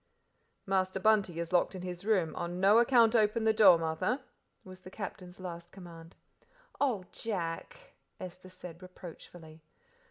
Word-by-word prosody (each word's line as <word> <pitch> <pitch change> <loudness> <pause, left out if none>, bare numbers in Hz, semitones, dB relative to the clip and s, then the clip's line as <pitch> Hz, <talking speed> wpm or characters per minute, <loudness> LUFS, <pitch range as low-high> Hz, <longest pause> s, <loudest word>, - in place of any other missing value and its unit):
"Master 190 -1 0
Bunty 195 -4 +2
is 170 +1 -4
locked 180 +2 +2
in 185 - -7
his 180 0 -6
room; 195 -7 +1
on 175 +1 -4
no 200 +4 +6
account 235 -1 +5
open 220 +1 +3
the 220 0 +4
door, 200 -5 +7
Martha," 165 - -1 0.4
was 185 0 -12
the 185 - -12
Captain's 185 -2 -8
last 175 -1 -8
command. 170 -3 -12 0.6
"Oh, 235 -10 0
Jack!" 225 - -5 0.3
Esther 185 0 -9
said 180 -2 -11
reproachfully. 170 -3 -12
185 Hz, 140 wpm, -31 LUFS, 175-215 Hz, 0.6 s, door